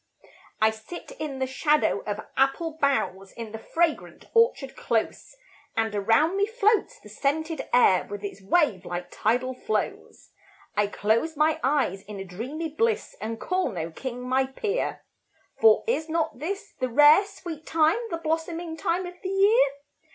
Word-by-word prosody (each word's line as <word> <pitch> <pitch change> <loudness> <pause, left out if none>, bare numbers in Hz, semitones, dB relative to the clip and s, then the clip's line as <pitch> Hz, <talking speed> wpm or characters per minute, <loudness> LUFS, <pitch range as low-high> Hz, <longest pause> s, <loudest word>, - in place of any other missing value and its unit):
I 220 0 +4
sit 220 +11 -10
in 300 -3 -4
the 265 - 0
shadow 295 +3 +2
of 205 0 -3
apple 270 +5 +1
boughs, 195 -9 0
In 230 -2 -7
the 220 - -6
fragrant 330 +6 -1
orchard 460 - +2
close, 230 - -2 0.4
And 225 -1 +1
around 225 - +2
me 405 +1 +2
floats 450 +2 +1
the - - -15
scented 315 +3 -2
air, 215 -7 +5
With 205 0 -6
its 200 -1 -6
wave 205 - +2
like 175 0 -5
tidal 245 +4 0
flows. 345 - -4 0.4
I 210 0 +2
close 230 +10 0
my 310 +1 +2
eyes 265 -9 +1
in 205 0 -9
a 195 - -5
dreamy 255 - -5
bliss, 445 +8 -1
And 225 +1 -4
call 365 -4 0
no 165 -3 -4
king 250 +7 -6
my 260 +1 +2
peer; 420 - -2 0.6
For 450 0 +6
is 390 -9 -1
not 315 -5 -1
this 395 +7 -5
the 255 -1 -1
rare, 295 - +7
sweet 345 -6 -9
time, 325 +6 +3
The 335 - -2
blossoming 325 +1 -3
time 345 +3 -1
of 355 0 -10
the 375 - -4
year? 395 - +5
300 Hz, 160 wpm, -26 LUFS, 225-345 Hz, 0.6 s, rare